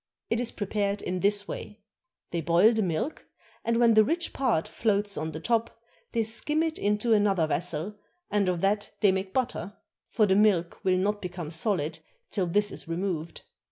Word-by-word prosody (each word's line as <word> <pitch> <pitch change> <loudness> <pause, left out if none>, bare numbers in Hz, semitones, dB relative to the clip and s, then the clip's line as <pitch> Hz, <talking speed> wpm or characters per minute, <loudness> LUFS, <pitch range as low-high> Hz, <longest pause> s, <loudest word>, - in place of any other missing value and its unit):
It 230 - +2
is 245 - +3
prepared 205 0 -2
in 180 0 -2
this 205 +1 +2
way: 210 0 -8 0.5
they 170 - -1
boil 175 +8 +5
the 220 - +1
milk, 185 - -2 0.4
and 230 0 +1
when 235 -1 +5
the 215 0 +7
rich 335 +9 -1
part 235 -12 +1
floats 205 -2 0
on 160 +1 -3
the 155 - -6
top, 230 +5 -1 0.3
they 230 - +2
skim 300 +8 +1
it 320 -1 -2
into 210 +3 +1
another 200 -5 +3
vessel, 170 +5 -2 0.3
and 205 -2 +2
of 175 -2 -1
that 205 +1 +1
they 205 - +5
make 190 0 -2
butter; 240 -4 -2 0.3
for 220 - +3
the 190 -2 +3
milk 195 -5 +2
will 185 -2 +3
not 205 +2 0
become 175 -4 -6
solid 160 -3 -1 0.3
till 190 -3 0
this 205 +4 +1
is - - -6
removed. 170 -1 -3
205 Hz, 185 wpm, -27 LUFS, 180-220 Hz, 0.5 s, the